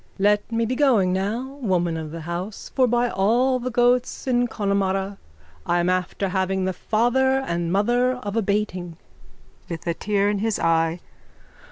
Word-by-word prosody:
_ - - -33
Let 205 +3 +2
me 230 0 +1
be 240 - -1
going 235 -10 +3
now, 235 +9 -3
woman 175 -6 0
of 160 -1 -5
the 165 +1 -7
house, 175 +5 -6
for 260 -2 +3
by 240 +1 +2
all 240 +6 +2
the 250 +1 -3
goats 245 +1 +1
in 245 -2 +2
Connemara 195 -2 -1 0.4
I'm 175 +1 +1
after 185 +2 -1
having 190 0 0
the 190 - -1
father 245 +7 +1
and 170 -8 -2
mother 240 +6 +2
of 210 -5 -6
a 225 - +2
bating. 190 -5 -2 0.7
_(With 165 -2 -6
a 170 - 0
tear 200 +2 0
in 205 -1 0
his 220 0 0
eye.) 165 +1 +1
200 Hz, 170 wpm, -23 LUFS, 180-240 Hz, 0.7 s, going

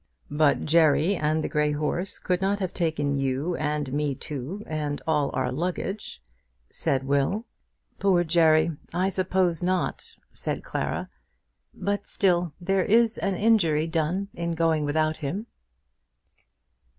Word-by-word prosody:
"But 145 0 +2
Jerry 160 +3 +4
and 155 -1 0
the - - -1
grey 150 0 +1
horse 155 +5 -2
could 180 0 -1
not 195 +1 +1
have 185 -3 -3
taken 150 -5 0
you 135 +6 -1
and 150 -3 -2
me 145 -1 0
too, 150 +10 -6
and 150 -2 -3
all 150 -3 +1
our 130 -1 0
luggage," 180 - -4 0.5
said 135 -1 0
Will. 140 - 0 0.5
"Poor 190 -3 +3
Jerry! 160 -1 +4 0.2
I 185 +2 +2
suppose 185 -3 0
not," 185 +1 -1 0.2
said - - -3
Clara; - - -3 0.6
"but 200 +2 -3
still 175 -4 +1
there 190 +1 +1
is 230 +2 +3
an 195 -1 0
injury 175 -8 +3
done 165 +4 -1
in 170 0 -3
going 160 -2 +1
without 155 +1 +1
him." 170 +9 -4
165 Hz, 135 wpm, -26 LUFS, 150-185 Hz, 0.6 s, Jerry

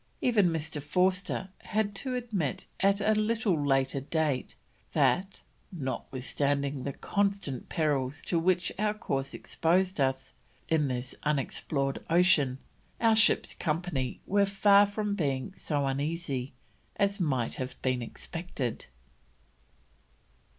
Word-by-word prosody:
Even 215 -7 +3
Mr. 155 -2 -3
Forster 185 +5 0
had 210 -1 -1
to 255 +5 -2
admit 215 - -2
at 200 +1 +3
a 215 +2 +3
little 215 - +1
later 135 -1 +2
date, 145 -2 -1 0.4
that: 190 +2 +1 0.3
"notwithstanding 140 -2 -2
the 140 - -2
constant 200 - -1
perils 145 -3 0
to 170 - 0
which 180 +1 +1
our 210 0 +1
course 135 -9 -2
exposed 180 +1 +1
us, 135 -1 0 0.3
in 155 -3 +2
this 125 0 -2
unexplored 140 -1 -1
ocean, 165 -7 +4 0.4
our 225 -1 +4
ship's 220 - +4
company 155 -5 -2
were 200 +1 +3
far 200 +1 +5
from 205 0 -2
being 140 -4 -1
so 145 -5 -1
uneasy 140 -1 -2 0.4
as 200 0 +1
might 130 -9 0
have 130 0 -5
been 130 -1 +1
expected." 135 0 -4
160 Hz, 115 wpm, -29 LUFS, 135-195 Hz, 0.4 s, far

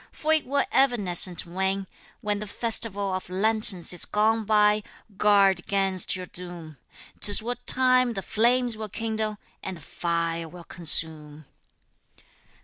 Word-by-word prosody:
for 315 +1 0
it 310 -4 0
will 280 +1 +1
evanescent 195 -9 +2
wane, 190 +2 -2 0.4
When 210 -2 -2
the 210 - -6
festival 205 -3 -2
of 185 -1 -5
lanterns 195 -2 0
is 175 - +1
gone 220 +1 +1
by, 210 0 +3 0.3
guard 195 -3 +3
'gainst 195 -3 0
your 185 -1 -6
doom, 175 -4 -9 0.4
'Tis 205 +1 +6
what 245 +1 -6
time 255 -1 +3
the 195 -3 -5
flames 240 +3 +1
will 215 -1 -7
kindle, 220 0 -3 0.2
and 190 -2 -6
the - - -15
fire 165 +1 -3
will 175 +1 -12
consume. 155 -3 0
200 Hz, 140 wpm, -25 LUFS, 180-220 Hz, 0.4 s, Tis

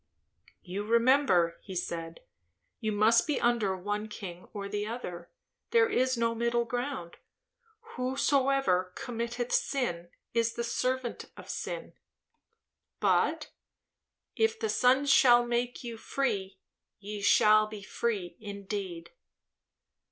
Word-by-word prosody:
"You 190 +3 -4
remember," 230 -7 +3
he 190 - -9
said. 165 -2 -4 0.6
"You 220 - -1
must 220 +5 +4
be 300 - 0
under 225 -6 +1
one 205 +3 -3
king 180 -4 -8
or 200 -3 -5
the 205 +1 -3
other; 180 -7 -6 0.4
there 460 -1 +4
is 255 - +1
no 230 0 +1
middle 235 +1 0
ground. 245 -7 -4 0.8
'Whosoever 260 -7 +1
committeth 240 0 -4
sin, 175 -11 -1 0.2
is 230 0 +1
the 235 - -2
servant 255 +1 -2
of - - -8
sin'; - - -5 1.1
but, - - +1 0.8
'If 450 0 +1
the 445 - -1
Son 260 -1 +3
shall 245 -3 +6
make 240 +1 -2
you 235 -2 -6
free, 205 -7 -2 0.4
ye 205 +1 -7
shall 215 +1 +5
be 215 -2 -9
free 195 -4 -3
indeed.'" 200 -4 -6
230 Hz, 115 wpm, -30 LUFS, 200-250 Hz, 1.1 s, shall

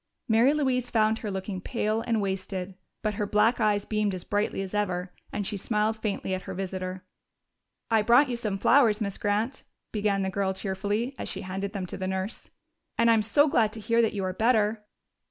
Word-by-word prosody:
Mary 230 +4 +5
Louise 260 -4 0
found 220 0 +2
her 215 - -4
looking 190 -1 -4
pale 215 +1 -1
and 225 -3 0
wasted, 190 -1 -3 0.3
but 215 -1 0
her 205 0 -2
black 210 +4 +3
eyes 210 -2 +2
beamed 210 -2 0
as 180 - -6
brightly 205 -1 -1
as 190 - -8
ever, 185 -3 -1 0.2
and 205 - -3
she 205 - -1
smiled 210 +2 0
faintly 210 -3 -3
at 185 - -2
her - - -7
visitor. 185 -1 -4 0.9
"I 220 -1 +5
brought 240 +7 +5
you 245 - -2
some 215 -4 -2
flowers, 230 0 +4
Miss 200 -3 -3
Grant," 215 +6 0 0.3
began 205 -2 0
the 190 - -1
girl 190 -1 -1
cheerfully 205 +6 -2
as - - -4
she - - -4
handed 195 +1 -4
them 195 -3 -3
to - - -6
the 185 - -3
nurse. 190 +2 -3 0.5
"And 230 0 +5
I'm 225 -1 +4
so 285 +8 +4
glad 225 -6 +3
to 225 - -7
hear 230 +2 +2
that 225 - +1
you 200 -2 -2
are 185 0 -1
better." 220 0 +2
210 Hz, 205 wpm, -27 LUFS, 195-225 Hz, 0.9 s, Mary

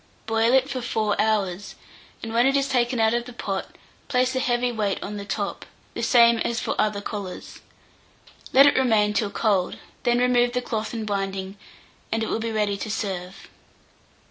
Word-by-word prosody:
Boil 225 +1 +2
it 265 0 +4
for 260 -2 -4
4 215 -3 0
hours, 205 -3 -1 0.5
and 225 0 -5
when 240 +3 +4
it 275 +1 +3
is 275 0 +1
taken 245 -2 +1
out 220 0 +3
of 240 0 -1
the 250 - -10
pot, 195 -4 -4 0.3
place 255 -1 +1
a - - +1
heavy 245 -1 +1
weight 210 -4 -1
on 210 +1 -5
the 200 - -6
top, 200 0 -3 0.3
the - - -4
same 235 -2 +5
as 235 0 -1
for - - -2
other 210 -1 +1
collars. 200 -3 -7 0.9
Let 275 +2 +8
it 285 - +5
remain 215 -5 +3
till 210 -1 0
cold; 200 -4 0 0.2
then 240 0 +2
remove 245 -1 +3
the 250 - 0
cloth 220 -1 -3
and 220 -1 -3
binding, 195 -1 -3 0.6
and 225 0 0
it - - -3
will - - -1
be 225 0 -3
ready 210 -2 0
to 215 - -5
serve. 190 -4 -4
225 Hz, 190 wpm, -24 LUFS, 205-245 Hz, 0.9 s, Let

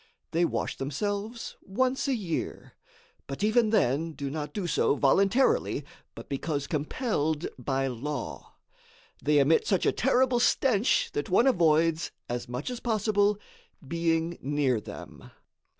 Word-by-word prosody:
They 170 +2 +2
wash - - -2
themselves 205 - -4
once 255 +8 0
a 270 - +2
year, 185 -8 -4 0.5
but 135 +8 -5
even 220 +1 +3
then 160 - +1
do 140 -2 -5
not 150 0 -4
do 205 -4 -3
so 165 - +2
voluntarily, 195 - +2 0.3
but - - -10
because 140 +1 -2
compelled 155 - -1
by 135 +1 -1
law. 135 +2 -5 0.7
They 150 +2 +3
emit 145 +3 +4
such 190 - +1
a - - +4
terrible 255 -1 +2
stench 240 -2 +2
that 145 - -3
one 190 +7 +4
avoids, 165 - +3 0.2
as 120 0 -4
much 125 - -4
as 245 - -5
possible, 210 -3 +1 0.5
being 165 +1 0
near 140 -4 +1
them. - - -10
165 Hz, 135 wpm, -28 LUFS, 145-215 Hz, 0.7 s, emit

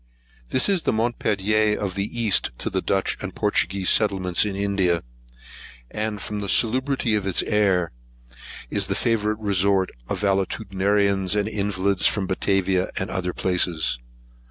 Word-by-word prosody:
THIS 130 - +4
is 195 -4 +1
the - - 0
Montpelier 110 -2 +1
of 100 -3 -3
the 100 +1 -2
East 110 -4 +3
to - - -3
the - - -1
Dutch - - -1
and - - -6
Portuguese 95 0 +1
settlements 95 -4 +2
in 100 -2 -3
India; 95 -4 0 0.9
and, 105 -1 -3
from 105 +2 -5
the 100 -1 -4
salubrity 130 0 +1
of 105 -2 0
its 95 - +2
air, 95 -5 +1 0.8
is 100 -2 +2
the 95 - -1
favourite 110 -2 0
resort 100 -2 +1 0.2
of - - -2
valetudinarians 100 0 0
and 105 0 0
invalids 100 -2 0
from 100 -3 0
Batavia 95 0 0
and 95 - -2
other 90 -1 -2
places. 85 -9 0
100 Hz, 145 wpm, -23 LUFS, 95-105 Hz, 0.9 s, THIS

